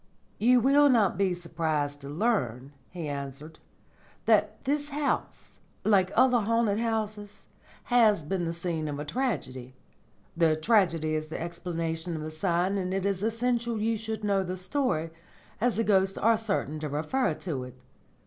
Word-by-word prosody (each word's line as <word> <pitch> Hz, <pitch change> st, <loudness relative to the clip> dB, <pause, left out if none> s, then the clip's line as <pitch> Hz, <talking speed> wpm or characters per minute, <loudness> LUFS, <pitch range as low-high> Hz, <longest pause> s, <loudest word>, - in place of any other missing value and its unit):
"You 245 Hz, +3 st, +5 dB
will 285 Hz, +3 st, +5 dB
not 220 Hz, -7 st, +3 dB
be 190 Hz, 0 st, +1 dB
surprised 155 Hz, -4 st, -2 dB
to 140 Hz, -, -8 dB
learn," 145 Hz, -, -1 dB, 0.2 s
he 170 Hz, -4 st, -6 dB
answered, 140 Hz, +2 st, -6 dB, 0.7 s
"that -, -, +2 dB
this 290 Hz, +2 st, 0 dB
house, 290 Hz, 0 st, -3 dB, 0.2 s
like 195 Hz, -3 st, +3 dB
other 250 Hz, 0 st, +5 dB
haunted 225 Hz, -1 st, +1 dB
houses, 215 Hz, -3 st, -3 dB, 0.4 s
has 220 Hz, -8 st, +4 dB
been 175 Hz, +3 st, -2 dB
the 165 Hz, -, -1 dB
scene 170 Hz, -2 st, -3 dB
of 145 Hz, -1 st, -4 dB
a 150 Hz, -, -5 dB
tragedy. 140 Hz, -, -3 dB, 0.6 s
The 165 Hz, -2 st, +3 dB
tragedy 165 Hz, -4 st, +2 dB
is 155 Hz, 0 st, -2 dB
the 155 Hz, -, -6 dB
explanation 170 Hz, -1 st, -4 dB
of 155 Hz, -, -5 dB
the 155 Hz, -, -5 dB
sign, 180 Hz, +4 st, 0 dB
and 185 Hz, 0 st, -2 dB
it 195 Hz, 0 st, -1 dB
is 195 Hz, -2 st, 0 dB
essential 235 Hz, +1 st, 0 dB
you 225 Hz, +2 st, +1 dB
should 220 Hz, 0 st, -5 dB
know 200 Hz, -2 st, +2 dB
the 185 Hz, 0 st, -4 dB
story, 180 Hz, -, -1 dB, 0.5 s
as 245 Hz, 0 st, +2 dB
the 225 Hz, -, +1 dB
ghosts 195 Hz, -2 st, +2 dB
are 225 Hz, +1 st, +4 dB
certain 200 Hz, -9 st, -2 dB
to 150 Hz, -1 st, -4 dB
refer 160 Hz, -, 0 dB
to 150 Hz, -8 st, -4 dB
it. 125 Hz, 0 st, -13 dB
185 Hz, 160 wpm, -28 LUFS, 155-225 Hz, 0.7 s, You